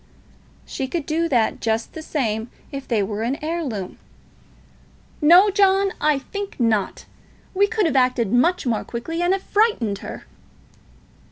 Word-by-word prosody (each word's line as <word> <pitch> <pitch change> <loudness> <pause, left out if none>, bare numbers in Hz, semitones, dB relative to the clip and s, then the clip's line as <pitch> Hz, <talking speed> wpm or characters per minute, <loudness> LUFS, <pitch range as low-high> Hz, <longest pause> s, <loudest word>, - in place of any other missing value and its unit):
"She 265 - -4
could 325 +1 -3
do 330 +2 0
that 235 -6 +1
just 225 0 -1
the 320 - -7
same 230 -7 -2 0.2
if 275 -1 -7
they 220 -4 +1
were 205 +2 -4
an 240 +4 -1
heirloom." 290 - -4 1.2
"No, 355 +7 +7
John. 390 -1 +3
I 300 -1 +3
think 400 +7 -7
not. 220 -4 0 0.5
We 400 +1 +3
could 435 -2 0
have 310 -4 0
acted 250 -5 +2
much 340 +9 +2
more 230 -3 0
quickly, 325 +9 -5
and 350 +1 +2
have 385 0 0
frightened 405 - +1
her." - - -8
285 Hz, 150 wpm, -22 LUFS, 230-360 Hz, 1.2 s, No